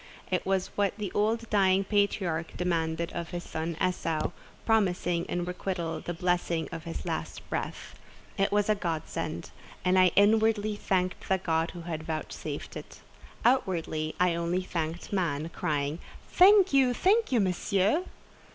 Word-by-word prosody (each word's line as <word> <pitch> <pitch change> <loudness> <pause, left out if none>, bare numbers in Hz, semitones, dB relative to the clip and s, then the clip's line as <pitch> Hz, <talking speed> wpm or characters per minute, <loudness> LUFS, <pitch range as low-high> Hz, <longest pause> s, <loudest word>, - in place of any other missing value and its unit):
It - - 0
was 190 -1 0
what 200 0 0
the 205 -4 -4
old 225 +2 0
dying 195 -2 +4
patriarch 195 -5 0
demanded 170 -2 -1
of 170 -1 -4
his 175 0 -5
son 160 0 -4
Esau, 165 -4 0 0.3
promising 180 -6 +1
in 175 0 -2
requital 180 -2 -3
the - - -5
blessing 175 -2 0
of 165 -1 -7
his 165 - -5
last - - -4
breath. - - -4 0.4
It 195 0 +1
was 205 0 +2
a 215 - +4
godsend; 170 -6 -4 0.3
and 185 +1 +4
I 185 - +7
inwardly 215 0 +4
thanked 185 -3 -1
the 190 - +4
God 165 -2 0
who 175 - -6
had 165 -2 -4
vouchsafed 155 0 -5
it. - - -9 0.4
Outwardly 170 -10 +1
I 180 -1 +3
only 170 +2 -1
thanked 170 0 -4
man, 165 -5 0
crying, 150 -2 -2 0.3
"Thank 385 -2 +6
you, 260 -3 +4
thank 420 - +3
you, 245 - +3
Monsieur!" 195 - +1
180 Hz, 150 wpm, -29 LUFS, 165-205 Hz, 0.4 s, I